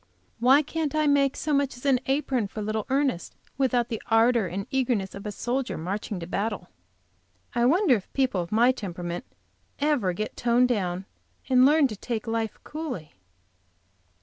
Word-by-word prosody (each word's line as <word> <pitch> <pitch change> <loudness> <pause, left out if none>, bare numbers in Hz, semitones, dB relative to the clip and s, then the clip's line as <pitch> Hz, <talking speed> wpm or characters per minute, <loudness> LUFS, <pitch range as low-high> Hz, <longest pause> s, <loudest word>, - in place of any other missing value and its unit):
Why 265 +5 +5
can't 310 0 -3
I 310 0 +2
make 285 -1 +3
so 305 - -1
much 280 -2 +1
as 245 - -13
an 270 -3 +4
apron 265 -5 0
for 215 - -8
little 215 0 -2
Ernest 270 -9 0 0.2
without 250 -3 +2
the 225 -3 -4
ardor 225 -2 +4
and 195 +3 -4
eagerness 245 -8 0
of 200 +1 -7
a - - -3
soldier 250 +5 -2
marching 195 +3 -4
to - - -4
battle? 200 +1 -3 0.8
I 240 0 +2
wonder 320 - +4
if 195 - -12
people 255 -9 +1
of 170 - -7
my 235 +4 +5
temperament 175 -3 -5 0.5
ever 285 -10 +1
get 215 +4 -4
toned 245 +1 +3
down, 185 -5 -1 0.4
and 255 0 +6
learn 300 0 +5
to 215 - -6
take 225 +2 -4
life 225 -1 -2
coolly? 280 - -6
240 Hz, 170 wpm, -26 LUFS, 205-270 Hz, 0.8 s, and